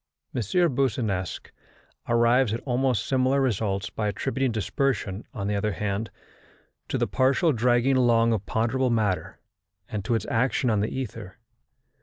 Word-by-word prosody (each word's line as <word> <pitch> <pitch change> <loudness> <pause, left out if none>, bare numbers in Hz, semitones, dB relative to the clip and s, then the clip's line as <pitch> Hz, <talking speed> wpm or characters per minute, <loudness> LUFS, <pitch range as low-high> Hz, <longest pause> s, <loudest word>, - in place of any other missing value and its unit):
M. 125 - -1 0.3
Boussinesq 110 -8 -1 0.6
arrives 120 0 +3
at - - -4
almost 125 -4 0
similar 130 +1 +2
results, 100 -7 -1
by 105 - -2
attributing 130 +4 -1
dispersion, 110 -1 -2
on 100 - -5
the 105 - 0
other 105 +1 0
hand, 100 +2 -2 0.8
to - - -1
the - - +1
partial 135 +6 +2
dragging 120 +2 +2
along 115 -2 +4
of 105 -2 -3
ponderable 125 +3 +1
matter 110 -5 -1 0.5
and 105 -2 -4
to 120 - 0
its 110 - -2
action 125 +1 +1
on 105 - +2
the 105 - 0
ether. 115 -6 -6
115 Hz, 145 wpm, -26 LUFS, 105-130 Hz, 0.8 s, along